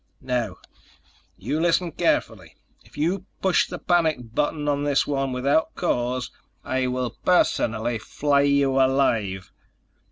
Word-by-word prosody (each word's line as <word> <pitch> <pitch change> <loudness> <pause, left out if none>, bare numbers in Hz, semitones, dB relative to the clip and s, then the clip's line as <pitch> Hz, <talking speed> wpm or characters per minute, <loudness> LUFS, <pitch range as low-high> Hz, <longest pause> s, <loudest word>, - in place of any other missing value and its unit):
Now, 120 -7 -2 0.8
you 150 - -2
listen 170 +1 +1
carefully: - - -1 0.3
If - - -19
you 180 +5 -1
push 190 -2 +2
the 180 - -6
panic 155 -11 0
button 150 +1 -1
on 145 0 0
this 145 -1 +2
one 135 -2 -1
without 140 +5 +1
cause, 125 -6 -1 0.3
I 130 0 -1
will 125 -2 -3
personally 115 -10 +1
flay 140 +4 +1
you 140 -1 +2
alive. 115 -8 +1
140 Hz, 125 wpm, -24 LUFS, 125-155 Hz, 0.8 s, push